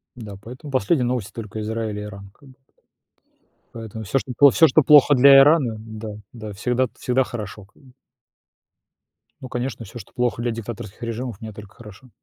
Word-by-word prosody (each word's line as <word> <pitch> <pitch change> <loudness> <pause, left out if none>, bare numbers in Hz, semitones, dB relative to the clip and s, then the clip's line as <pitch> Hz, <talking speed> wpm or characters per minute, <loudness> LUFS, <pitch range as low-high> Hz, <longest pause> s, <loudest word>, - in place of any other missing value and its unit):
Да. 105 -5 -9
Поэтому 130 +6 -10
последние 130 +2 +1
новости 125 -5 -2
только 110 -1 -7
Израиль 110 -1 -3
и - - -5
Иран 100 -1 -10
как 140 - -19
бы. 130 - -18 1.2
Поэтому 110 -1 -8
всё, 110 +7 -1
что 125 - -8
пло 140 -1 +8
всё 160 - +5
что 155 +4 +4
плохо 145 0 +6
для 135 +2 +8
Ирана, 140 -5 +4
да, 110 0 -8 0.2
да 110 -3 -8
всегда 125 +5 0
всегда 130 +1 +1
хорошо 105 -4 -8
как 105 - -26
бы. 130 - -18 1.5
Ну 130 - -7
конечно, 125 -2 -4
всё, 120 +5 -10
что - - -13
плохо 120 -1 -1
для 120 0 -1
диктаторских 115 -1 -8
режимов, 115 -1 -5
мне 110 -2 -8
только 105 0 -13
хорошо. 115 +3 -14
115 Hz, 180 wpm, -22 LUFS, 110-130 Hz, 1.5 s, пло